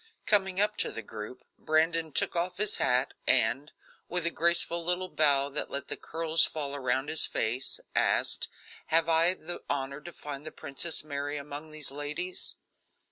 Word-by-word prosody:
Coming 190 -3 +3
up 210 +1 +2
to - - +1
the 115 - -7
group, 110 +4 -8 0.2
Brandon 160 +1 +1
took - - -1
off 175 +1 -2
his 210 +1 +1
hat, 125 0 +1
and, 130 +7 +2 0.4
with 180 -1 0
a 170 - 0
graceful 170 0 +2
little 180 +2 -1
bow 140 -4 +2
that 140 - -2
let 140 0 -4
the - - -3
curls 165 0 +3
fall 145 -3 -4
around 130 0 -1
his 155 0 +5
face, 120 +4 -1 0.2
asked: - - +2 0.4
"Have 165 0 +3
I 165 +2 +3
the 175 0 -7
honor 140 +1 -3
to 175 - -9
find 145 -3 -8
the 155 - -6
Princess 145 +3 -1
Mary 145 -1 -4
among 145 +2 -8
these 155 -3 -2
ladies?" 150 +6 -1
155 Hz, 170 wpm, -29 LUFS, 140-170 Hz, 0.4 s, his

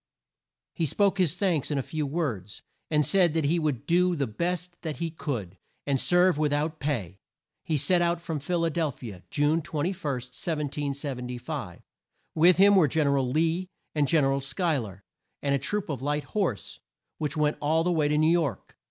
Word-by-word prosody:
He 165 -3 -1
spoke 195 +5 +2
his 175 -3 +2
thanks 175 -6 0
in 145 - 0
a 135 - 0
few 155 +1 -3
words, 120 - -3 0.3
and 150 -2 +2
said 175 -1 +3
that 160 -3 +1
he 165 +4 +2
would 150 -7 -1
do 180 +1 +3
the 140 -3 0
best 175 +8 -3
that 155 -3 -4
he 165 -1 -3
could, 110 - -5 0.3
and 140 -2 +1
serve 175 -2 +3
with 150 -1 +1
out 155 +2 -1
pay. 105 - -3 0.5
He 155 - 0
set 175 +5 +2
out 170 0 +1
from 165 -3 -4
Phil 170 +4 0
a 165 - 0
del 160 -2 0
phi 120 -3 -9
a 90 -3 -12
June 150 +3 +2
21, 165 +2 -2
1775. 140 -2 -4 0.5
With 170 +2 +5
him 200 +1 +7
were 175 -6 +6
Gen 155 +2 +1
er 140 0 +3
al 130 -2 0
Lee 165 +6 0 0.2
and 150 -2 +2
Gen 155 +2 +3
er 135 - +2
al 140 - -1
Schuy 155 +1 0
ler, 100 -3 -9 0.4
and 140 -1 +1
a 140 - +2
troop 200 +10 -2
of 140 -5 -4
light 145 +2 -1
horse, 185 - -2 0.4
which 150 -1 -2
went 150 0 +1
all 160 +2 +2
the 180 - +1
way 155 -4 +2
to 150 0 +1
New 155 +1 +4
York. 170 -5 -1
150 Hz, 200 wpm, -27 LUFS, 140-170 Hz, 0.5 s, him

